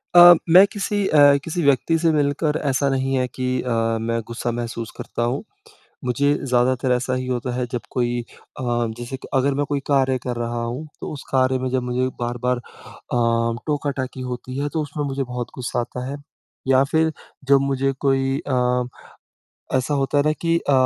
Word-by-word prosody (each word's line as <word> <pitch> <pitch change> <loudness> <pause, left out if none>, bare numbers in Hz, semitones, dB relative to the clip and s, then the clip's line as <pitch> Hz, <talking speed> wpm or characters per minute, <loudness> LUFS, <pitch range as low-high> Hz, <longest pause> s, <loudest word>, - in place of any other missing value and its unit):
अ, 175 0 +11 0.2
मैं 185 +4 +9
किसी 205 0 -1
अ, 145 -2 +6
किसी 170 +2 -2
व्यक्ति 140 +4 +3
से 165 -1 +3
मिलकर 150 +1 +1
ऐसा 140 +1 +2
नहीं 135 0 0
हैं 125 0 +1
कि 130 - -3 0.2
अ, 125 - -4 0.3
मैं 115 0 -1
ग़ुस्सा 120 +1 -3
महसूस 115 -1 -4
करता 120 - -3
हूँ। 135 - -3 0.6
मुझे 140 +4 +2
ज़्यादातर 125 0 +1
ऐसा 125 +1 0
ही 130 - -3
होता 125 0 -2
है 125 -1 -1
जब 120 - -2
कोई 120 -1 0
अ, 120 - -14 0.4
जैसे 120 +2 -5 0.2
अगर 135 +1 +2
मैं 145 - +2
कोई 145 -1 0
कार्य 135 -2 +3
कर 125 -1 -3
रहा 120 0 -3
हूँ, 125 +7 -4
तो - - -5
उस 140 - -8
कार्य 130 0 +3
में 130 0 -2
जब 130 -1 0
मुझे 125 +1 +1
बार-बार 120 +1 -1
अ, 115 -1 -2
टोका-टाकी 140 -3 -2
होती 130 +2 -6
है 145 0 -1
तो 160 - 0
उसमें 145 0 -4
मुझे 135 0 -2
बहुत 125 -1 -4
ग़ुस्सा 125 -1 -2
आता 125 +1 -6
है। 140 - -4 0.5
या 130 0 +5
फिर 160 0 +3 0.4
जब 140 -1 +7
मुझे 135 0 0
कोई 135 0 +2
अ, 125 -1 +1 0.9
ऐसा 130 +3 0
होता 140 +1 +1
है 145 - +3
ना 155 - +3
कि 165 0 +3
अ - - +4
130 Hz, 185 wpm, -22 LUFS, 125-145 Hz, 0.9 s, अ